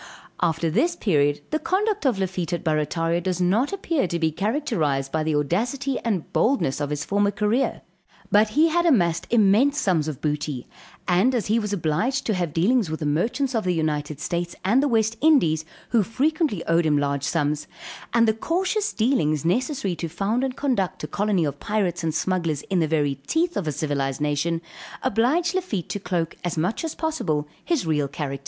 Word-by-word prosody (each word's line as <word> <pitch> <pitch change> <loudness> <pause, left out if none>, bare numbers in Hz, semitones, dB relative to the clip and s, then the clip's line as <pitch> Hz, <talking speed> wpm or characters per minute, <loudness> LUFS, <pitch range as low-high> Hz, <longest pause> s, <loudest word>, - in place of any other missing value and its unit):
After 160 0 +1
this 340 - +2
period, 145 - +1
the 310 - +1
conduct 395 0 0
of 245 - +1
Lafitte 185 -3 -2
at 170 - -2
Barrataria 165 +2 0
does 180 0 -2
not 200 +10 +2
appear 335 - 0
to 170 - -2
be 160 -1 +1
characterized 165 - -1
by 160 - 0
the 155 -1 0
audacity 240 - -1
and 205 -8 -3
boldness 225 - +1
of 145 - -1
his 150 -1 -3
former 200 0 +2
career; 210 +5 0 0.5
but 210 +1 +5
he 325 +2 +6
had 345 +2 +2
amassed 175 - +2
immense 235 +6 +4
sums 165 -6 +1
of 150 -4 -4
booty, 150 -4 -2 0.4
and 195 +8 +3
as 230 - 0
he 230 - +3
was 210 -2 -3
obliged 205 - 0
to 220 - +1
have 175 -4 -1
dealings 200 - +2
with 160 +1 -4
the - - -1
merchants 240 - 0
of 225 -2 0
the 180 -1 0
United 150 -2 -2
States, 175 +1 -3
and 230 +8 +4
the 290 - +2
West 225 -2 +1
Indies, 170 - +4 0.2
who 230 - +3
frequently 270 - 0
owed 165 0 +2
him 150 -1 +3
large 140 -1 0
sums, 150 -1 -1 0.4
and 230 -1 +4
the 220 - +4
cautious 380 - -1
dealings 165 - +1
necessary 240 - 0
to 165 +1 -4
found 210 +9 -1
and 260 -1 -2
conduct 220 -10 -1
a - - -2
colony 200 -5 +1
of 145 -1 -4
Pirates 195 -5 -1
and 160 -1 -1
Smugglers 170 -4 -1
in 185 - +3
the 160 - +2
very 145 -3 0
teeth 335 +2 +1
of 175 - -2
a - - +1
civilized 140 -2 -2
nation, 150 +3 -1 0.4
obliged 260 +8 +2
Lafitte 350 - -2
to 205 - -3
cloak 175 -3 -2
as 175 -2 -2
much 180 - -1
as 325 - -4
possible 160 - -1 0.2
his 330 - 0
real 150 -3 +1
character. 140 -1 -4
185 Hz, 190 wpm, -24 LUFS, 155-250 Hz, 0.5 s, he